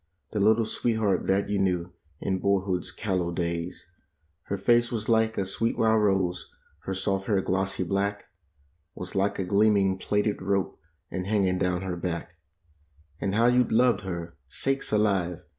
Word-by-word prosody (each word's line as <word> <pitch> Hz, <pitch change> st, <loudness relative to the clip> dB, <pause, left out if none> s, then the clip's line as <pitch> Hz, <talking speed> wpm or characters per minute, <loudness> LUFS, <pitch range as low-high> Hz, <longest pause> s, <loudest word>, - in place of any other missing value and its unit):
The 105 Hz, -, -2 dB
little 110 Hz, +3 st, +4 dB
sweetheart 110 Hz, -4 st, 0 dB
that 95 Hz, +1 st, +2 dB
you 100 Hz, 0 st, 0 dB
knew 90 Hz, -2 st, 0 dB, 0.3 s
in 95 Hz, -1 st, -2 dB
boy¬ 100 Hz, -1 st, +2 dB
hood's 90 Hz, -2 st, -1 dB
callow 90 Hz, -5 st, -2 dB
days; 85 Hz, 0 st, -3 dB, 0.6 s
Her 100 Hz, -, -2 dB
face 120 Hz, +4 st, +3 dB
was 110 Hz, -2 st, -2 dB
like 110 Hz, -1 st, +2 dB
a 100 Hz, -, 0 dB
sweet 105 Hz, +5 st, -1 dB
wild 110 Hz, -1 st, +3 dB
rose; 95 Hz, -3 st, 0 dB, 0.4 s
her 95 Hz, -, -2 dB
soft 95 Hz, 0 st, -1 dB
hair, 100 Hz, -3 st, +2 dB
glossy 95 Hz, 0 st, 0 dB
black, 100 Hz, +3 st, -1 dB, 0.7 s
a -, -, -8 dB
s 90 Hz, -, -4 dB
like 100 Hz, +1 st, 0 dB
a 95 Hz, -, -1 dB
gleaming 100 Hz, 0 st, +3 dB
d 105 Hz, +2 st, +1 dB
rope, 100 Hz, 0 st, -1 dB, 0.3 s
and 90 Hz, 0 st, -3 dB
a -, -, -4 dB
n 105 Hz, -2 st, +2 dB
g 95 Hz, -, +2 dB
i -, -, +1 dB
n 90 Hz, -, -2 dB
g -, -, +1 dB
down 90 Hz, 0 st, 0 dB
her 95 Hz, -2 st, -3 dB
back. 85 Hz, -1 st, -4 dB, 0.9 s
W 100 Hz, -, 0 dB
\nd 95 Hz, -, -1 dB
how 115 Hz, +2 st, +4 dB
you 125 Hz, +1 st, +5 dB
loved 115 Hz, -2 st, +3 dB
her! 85 Hz, -3 st, -6 dB
Sakes 135 Hz, -, -1 dB
alive! 95 Hz, -5 st, +1 dB
95 Hz, 190 wpm, -27 LUFS, 90-105 Hz, 0.9 s, you